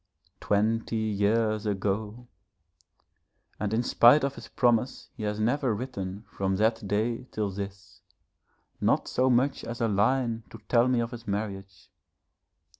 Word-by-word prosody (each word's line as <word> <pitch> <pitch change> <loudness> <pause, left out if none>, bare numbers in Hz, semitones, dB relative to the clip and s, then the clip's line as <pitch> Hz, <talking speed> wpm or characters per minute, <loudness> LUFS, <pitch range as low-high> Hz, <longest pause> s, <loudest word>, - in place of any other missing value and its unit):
Twenty 110 +3 0
years 110 0 +1
ago! 105 +4 -2 1.3
and 105 -1 -2
in 115 +2 +1
spite 120 +4 +6
of 140 0 0
his - - -10
promise 120 +1 +1
he - - -9
has 105 0 -2
never 120 +1 +1
written 105 -4 -5
from 95 0 -2
that 110 +1 +1
day 115 +5 -1
till 105 -2 -2
this, 100 0 -8 0.8
not - - +2
so 130 +1 +2
much 130 +3 +2
as 115 +1 -6
a 115 - +2
line 115 +3 +1
to - - -10
tell 120 +2 +4
me 125 -2 +2
of 115 0 -3
his 120 -3 -9
marriage. 100 -2 -5
110 Hz, 140 wpm, -28 LUFS, 100-120 Hz, 1.3 s, spite